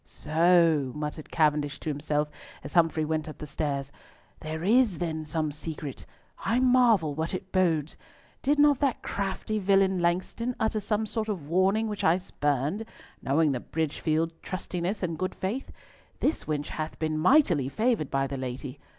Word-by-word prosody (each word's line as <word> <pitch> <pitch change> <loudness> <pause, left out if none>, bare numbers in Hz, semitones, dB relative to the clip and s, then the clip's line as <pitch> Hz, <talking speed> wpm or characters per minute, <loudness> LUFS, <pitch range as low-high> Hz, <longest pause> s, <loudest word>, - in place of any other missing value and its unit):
"So," 160 -3 +3
muttered 150 +1 -5
Cavendish 150 -2 +1
to - - -3
himself 150 +1 -1 0.4
as 140 - -8
Humfrey 165 -2 +3
went 155 0 -2
up 155 - -9
the 150 - -7
stairs, 140 -2 -3 0.5
"there 160 +1 -5
is 220 -2 +4
then 160 -2 -3
some 155 -1 -1
secret. 150 -2 -6 0.4
I 235 - +2
marvel 245 - +4
what 160 +5 -2
it 185 +1 -7
bodes! 165 -5 +1 0.4
Did 290 +2 +2
not 290 -2 +5
that 275 -4 0
crafty 200 +2 -2
villain 195 -1 +3
Langston 185 +8 -1
utter 220 0 +1
some 210 +1 -1
sort 220 0 -3
of 175 -9 -4
warning 190 +6 +2
which 210 -1 -4
I 165 +2 +4
spurned, 145 - -1 0.4
knowing 150 +2 +2
the 130 - -1
Bridgefield 160 +2 -1
trustiness 185 +1 -3
and 165 -3 -2
good 185 0 -2
faith? 220 +9 -3 0.5
This 310 - 0
wench 150 -1 -2
hath 155 0 -4
been 155 -1 -1
mightily 175 - +4
favoured 220 - 0
by 135 0 +1
the 135 0 -4
lady. 130 0 -5
165 Hz, 160 wpm, -28 LUFS, 150-200 Hz, 0.5 s, not